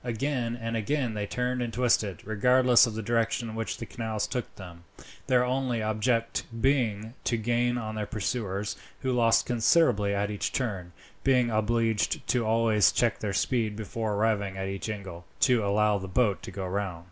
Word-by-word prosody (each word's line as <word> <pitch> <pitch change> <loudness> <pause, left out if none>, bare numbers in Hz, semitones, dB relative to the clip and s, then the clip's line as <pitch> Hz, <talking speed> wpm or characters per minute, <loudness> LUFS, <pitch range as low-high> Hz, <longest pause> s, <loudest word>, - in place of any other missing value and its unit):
Again 120 0 -2
and 115 0 -3
again 120 +2 -1
they 105 -1 -3
turned 125 +2 -2
and 120 -1 -2
twisted, 115 -6 0
regardless 125 +3 +4
of 110 - -5
the 110 - -4
direction 115 +1 0
in - - -7
which 115 0 -3
the 115 - -6
canals 110 -2 -3
took 125 -2 -5
them, 85 -3 -11 0.4
their 125 -2 +3
only 125 -3 -1
object 115 +2 0 0.2
being 115 -4 +1
to 120 - +1
gain 120 +2 0
on 110 -2 -4
their 105 -1 -3
pursuers, 105 -1 -3 0.3
who 130 - -1
lost 115 -2 +3
considerably 115 -4 +3
at 100 +1 -1
each 105 - -3
turn, 100 -9 -3 0.3
being 125 -3 +3
obliged 110 0 +1 0.2
always 110 -3 +3
to - - -9
check 120 -2 +2
their 105 - -2
speed, 110 +1 0
before 110 0 -3
arriving 100 -2 0
at 95 0 -3
each 95 +2 -4
angle, 95 -5 -6 0.2
to 120 -3 +4
allow 105 +1 +2
the 95 - -6
boat 100 +1 +1
to - - -8
go 95 0 -5
round. 95 -2 -3
110 Hz, 180 wpm, -28 LUFS, 105-120 Hz, 0.4 s, regardless